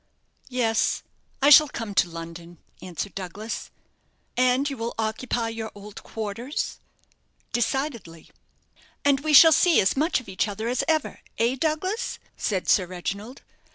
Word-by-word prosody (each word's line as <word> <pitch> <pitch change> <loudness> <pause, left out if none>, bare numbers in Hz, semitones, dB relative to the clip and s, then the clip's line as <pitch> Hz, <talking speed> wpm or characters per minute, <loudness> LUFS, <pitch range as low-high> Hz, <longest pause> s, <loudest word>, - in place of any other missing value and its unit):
"Yes, 230 -3 +1 0.4
I 290 - +6
shall 305 +1 +9
come 225 -5 -5
to 180 - +3
London," 170 +1 -9 0.2
answered 185 +2 -5
Douglas. 195 +4 -6 0.7
"And 255 +2 +3
you 280 - -3
will 230 -1 -4
occupy 225 +1 -2
your 225 -1 -5
old 205 0 -10
quarters?" 225 +6 -4 0.7
"Decidedly." 240 - -2 0.7
"And 280 -1 +4
we 305 +2 -1
shall 320 +3 +10
see 325 +2 +5
as 190 - +2
much 310 +3 +1
of 250 - -14
each 190 +2 -1
other 215 +2 -4
as 245 +1 0
ever 315 -2 0 0.2
eh, 235 +3 +2
Douglas?" 330 - -2 0.2
said 190 -4 -2
Sir 185 -3 +3
Reginald. 200 +7 -6
230 Hz, 140 wpm, -25 LUFS, 200-275 Hz, 0.7 s, shall